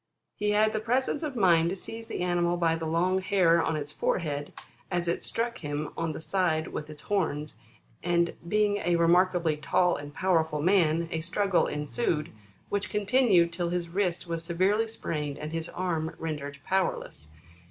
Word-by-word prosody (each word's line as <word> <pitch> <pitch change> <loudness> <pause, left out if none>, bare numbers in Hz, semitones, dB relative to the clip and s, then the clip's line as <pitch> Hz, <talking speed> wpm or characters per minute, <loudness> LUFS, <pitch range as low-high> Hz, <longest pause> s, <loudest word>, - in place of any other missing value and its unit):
He 210 - -1
had 215 +1 +3
the 215 - 0
presence 255 +6 0
of 300 -4 -4
mind 170 -6 +4
to 185 - -2
seize 225 +4 -7
the - - -4
animal 175 -1 +1
by 165 -1 +2
the 165 -1 -4
long 180 +4 +1
hair 185 -3 +3
on 160 - 0
its 150 -1 -4
forehead, 150 -3 -2 0.4
as 175 -1 -1
it 170 - 0
struck 235 +1 -2
him 150 -1 -4
on 165 -1 -1
the - - -6
side 160 -2 0
with 150 0 -6
its 150 -1 -8
horns, 155 - -1 0.4
and 170 -1 +1
being 210 +1 +2
a 175 -3 +1
remarkably 170 -1 +3
tall 175 +4 +2
and 145 0 -8
powerful 160 -3 +1
man, 170 -1 +3
a 160 - -1
struggle 190 +2 +1
ensued, 150 +1 -1 0.4
which 205 -1 -1
continued 205 -4 +3
till 175 0 -1
his 175 -1 -2
wrist 180 -1 -1
was 165 -1 -3
severely 190 +7 +1
sprained, 150 -9 -4
and 150 0 -6
his 165 0 -3
arm 165 -3 -2
rendered 150 -3 -5
powerless. 185 - -1
170 Hz, 175 wpm, -28 LUFS, 160-190 Hz, 0.4 s, mind